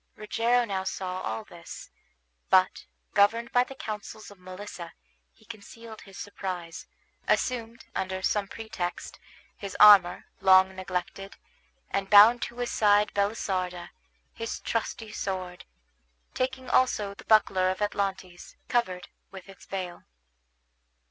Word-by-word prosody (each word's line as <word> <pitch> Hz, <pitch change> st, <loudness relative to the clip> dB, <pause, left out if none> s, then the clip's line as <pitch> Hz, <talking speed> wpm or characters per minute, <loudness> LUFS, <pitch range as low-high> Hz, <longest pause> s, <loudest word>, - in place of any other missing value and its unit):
Rogero 235 Hz, +3 st, +1 dB
now 195 Hz, -3 st, -3 dB
saw 185 Hz, -1 st, -4 dB
all 110 Hz, +1 st, -4 dB
this, -, -, -11 dB, 0.6 s
but, -, -, +3 dB, 0.3 s
governed 230 Hz, +4 st, +3 dB
by 245 Hz, -, +4 dB
the 270 Hz, -, -11 dB
counsels 215 Hz, -3 st, -7 dB
of 200 Hz, -, -16 dB
Melissa, 185 Hz, -1 st, -9 dB, 0.4 s
he -, -, -25 dB
concealed 225 Hz, 0 st, -11 dB
his 195 Hz, -2 st, -14 dB
surprise, 185 Hz, -4 st, -6 dB, 0.4 s
assumed 235 Hz, -2 st, -1 dB
under 190 Hz, 0 st, -3 dB
some 205 Hz, 0 st, 0 dB
pretext 190 Hz, -5 st, -6 dB, 0.4 s
his 200 Hz, -2 st, -7 dB
armor, 200 Hz, -4 st, +7 dB
long 190 Hz, 0 st, +5 dB
neglected, 185 Hz, +1 st, -5 dB, 0.6 s
and 195 Hz, 0 st, -2 dB
bound 220 Hz, +4 st, +8 dB
to 240 Hz, -, -5 dB
his 245 Hz, -1 st, -2 dB
side 210 Hz, 0 st, +3 dB
Belisarda, 185 Hz, -4 st, -2 dB, 0.4 s
his 230 Hz, 0 st, -5 dB
trusty 225 Hz, -1 st, -3 dB
sword, 185 Hz, -3 st, -5 dB, 0.7 s
taking 260 Hz, 0 st, -3 dB
also 210 Hz, -6 st, +1 dB
the -, -, -14 dB
buckler 190 Hz, -4 st, +4 dB
of 185 Hz, -, -2 dB
Atlantes, 195 Hz, -3 st, -3 dB
covered 185 Hz, -7 st, -1 dB, 0.2 s
with 190 Hz, -1 st, -11 dB
its 195 Hz, -1 st, -15 dB
veil. 180 Hz, -3 st, -6 dB
200 Hz, 120 wpm, -27 LUFS, 185-220 Hz, 0.7 s, bound